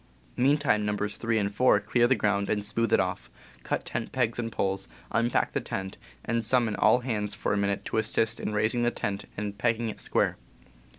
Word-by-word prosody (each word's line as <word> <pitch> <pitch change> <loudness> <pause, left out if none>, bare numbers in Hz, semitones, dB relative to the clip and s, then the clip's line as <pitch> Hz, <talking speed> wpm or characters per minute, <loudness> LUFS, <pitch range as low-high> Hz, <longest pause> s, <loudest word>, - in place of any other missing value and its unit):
Meantime 135 -5 +3
Nos. 105 0 -1
3 115 -1 0
and 100 -1 0
4 125 +5 +4
clear 120 -1 +2
the 130 - +4
ground 100 -3 0
and 105 -1 0
smooth 115 +2 -1
it - - +5
off, - - -2 0.3
cut - - -2
tent 115 - -4
pegs 125 -4 0
and 115 -1 -2
poles, 95 -2 -2 0.2
unpack 115 +1 +1
the - - 0
tent, 95 0 -5 0.3
and 115 0 0
summon 115 -2 +2
all 110 +4 +4
hands 105 -5 -2
for 105 - -1
a - - +1
minute 100 0 -1
to - - -2
assist 110 +1 +1
in - - -3
raising 110 +3 +1
the 120 - +3
tent 100 -4 -3
and 100 0 -4
pegging 115 0 +1
it - - -7
"square." - - +1
110 Hz, 200 wpm, -28 LUFS, 105-120 Hz, 0.3 s, it